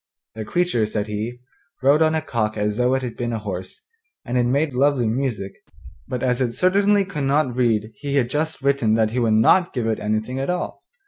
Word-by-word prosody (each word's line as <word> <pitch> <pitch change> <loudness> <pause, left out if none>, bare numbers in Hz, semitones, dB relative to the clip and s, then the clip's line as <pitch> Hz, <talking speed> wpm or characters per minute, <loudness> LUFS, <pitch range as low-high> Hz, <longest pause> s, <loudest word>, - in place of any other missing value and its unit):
The 110 0 -6
creature, 175 -11 +1
said 105 -1 -2
he, 110 +4 -5 0.4
rode 145 +4 +5
on 160 0 +3
a 160 - -1
cock 110 -2 -2
as 105 0 -1
though 125 +1 +2
it 130 - -2
had 120 -3 -5
been 120 -1 -3
a 115 - -2
horse, 95 -4 -6 0.4
and 120 - -3
it 125 -1 +3
made 140 +3 +1
lovely 135 -2 +2
music, 110 -5 -2 0.5
but 125 -2 -4
as 125 0 +1
it 120 -2 0
certainly 200 - +3
could 150 -8 -4
not 135 -3 +1
read 115 -3 +1
he 140 -1 -3
had 130 -4 +2
just 150 +2 -3
written 135 -6 +2
that 110 -1 +2
he 125 - -1
would 115 -2 +2
not 175 +11 +4
give 120 -4 -2
it 110 -1 -1
anything 110 +5 -2
at 135 - -2
all. 180 0 -3
125 Hz, 215 wpm, -22 LUFS, 110-140 Hz, 0.5 s, rode